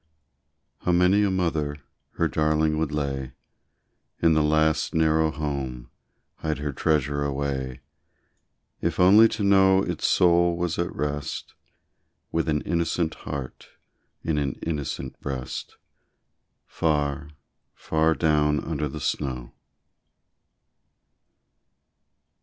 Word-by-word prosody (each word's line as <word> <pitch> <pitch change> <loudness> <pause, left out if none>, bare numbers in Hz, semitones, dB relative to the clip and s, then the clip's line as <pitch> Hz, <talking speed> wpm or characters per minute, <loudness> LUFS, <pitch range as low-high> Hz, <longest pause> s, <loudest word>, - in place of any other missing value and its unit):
How 90 - 0
many 90 +3 +4
a 100 - +2
mother 80 -6 -1 0.4
her - - +1
darling 75 0 +1
would 80 -2 -1
lay 70 -3 -3 0.9
In 85 -1 +4
the 80 - +3
last, 80 +1 +2
narrow 80 0 +3
home 70 -5 -4 0.5
hide 80 -1 -2
her 75 0 -3
treasure 70 -1 0
away 70 -2 -3 1.0
If - - -1
only 100 +5 +8
to 110 - -3
know 95 -1 +5
its - - -1
soul 85 -1 +4
was 85 -2 -2
at 85 - -1
rest 75 -1 -4 0.8
With 80 0 0
an 75 -1 +1
innocent 85 -1 -1
heart 70 -3 -7 0.6
in 75 -2 0
an 70 -3 -1
innocent 70 -4 -4
breast, 65 -3 -5 0.9
Far, 75 -2 -1 0.5
far 80 +1 +1
down 75 -2 +2
under 75 -2 -3
the - - -6
snow! 65 -4 -3
75 Hz, 105 wpm, -25 LUFS, 70-85 Hz, 1.0 s, only